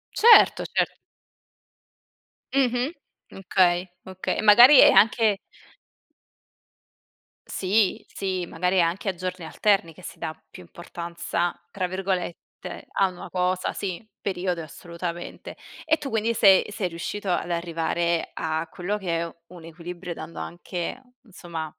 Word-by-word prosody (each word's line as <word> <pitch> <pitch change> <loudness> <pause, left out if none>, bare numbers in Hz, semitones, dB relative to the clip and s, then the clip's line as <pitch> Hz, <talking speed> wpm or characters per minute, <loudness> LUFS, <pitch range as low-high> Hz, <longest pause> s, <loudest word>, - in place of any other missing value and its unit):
Certo, 460 +1 +7
cer - - +1 1.6
Mh-mh. 255 +2 +1 0.4
Okay, 180 -1 +1 0.2
okay. 185 0 -3
Magari 245 +7 +9
è - - +9
anche 220 -2 +4 2.1
Sì, 195 +1 +1
sì, 185 -2 -3
magari 180 +3 -1
è - - +5
anche 175 +4 0
a 185 - -3
giorni 185 -1 -5
alterni 190 -1 +1
che 185 - -16
si - - -9
dà 155 - -4 0.2
più 180 - -12
importanza, 170 0 -4 0.2
tra 185 -3 -2
virgolette 185 -2 -5
"a 195 - +2
una 180 - -10
cosa" 185 0 -1
sì, 195 +2 -5 0.2
periodo 180 -2 -2
e - - -7
assolutamente. 170 +2 -7 0.3
E 315 0 +2
tu 290 -3 -6
quindi 225 0 0
sei 200 -2 +5
sei 200 -3 -2
riuscito 185 +4 -5
ad 175 0 -1
arrivare 170 0 -1
a 160 0 -2
quello 195 +4 -3
che 175 -5 -2
è 170 0 -5
un 170 -2 -13
equilibrio, 175 +1 -7
dando 160 +1 -9
anche, 175 +7 -5 0.2
insomma, 175 -6 -7
180 Hz, 130 wpm, -25 LUFS, 170-200 Hz, 2.1 s, Magari